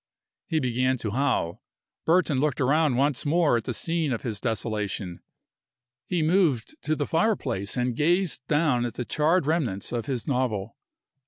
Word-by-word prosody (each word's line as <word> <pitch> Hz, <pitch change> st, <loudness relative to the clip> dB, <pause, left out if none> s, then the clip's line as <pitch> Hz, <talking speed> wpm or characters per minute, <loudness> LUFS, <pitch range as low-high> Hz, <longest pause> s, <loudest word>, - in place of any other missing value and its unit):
He 160 Hz, -, +1 dB
began 130 Hz, 0 st, +1 dB
to 110 Hz, -3 st, -3 dB
howl. 125 Hz, -9 st, 0 dB, 0.5 s
Burton 165 Hz, -5 st, +3 dB
looked 145 Hz, -2 st, 0 dB
around 145 Hz, +1 st, +3 dB
once 140 Hz, -1 st, +2 dB
more 155 Hz, -2 st, +3 dB
at 115 Hz, -, -5 dB
the -, -, -2 dB
scene 165 Hz, -1 st, 0 dB
of 115 Hz, -, -3 dB
his 110 Hz, -5 st, -4 dB
desolation. 105 Hz, -6 st, -3 dB, 0.9 s
He 175 Hz, -3 st, 0 dB
moved 155 Hz, -, +2 dB
to 155 Hz, +2 st, 0 dB
the 145 Hz, -, -1 dB
fireplace 140 Hz, -, 0 dB
and 125 Hz, -1 st, 0 dB
gazed 175 Hz, +1 st, +1 dB
down 150 Hz, -5 st, +2 dB
at 120 Hz, -2 st, -3 dB
the 125 Hz, -, -3 dB
charred 155 Hz, +4 st, +2 dB
remnants 140 Hz, -, -1 dB
of 120 Hz, +1 st, -3 dB
his 130 Hz, -5 st, -3 dB
novel. 120 Hz, -6 st, -1 dB
130 Hz, 160 wpm, -26 LUFS, 115-155 Hz, 0.9 s, Burton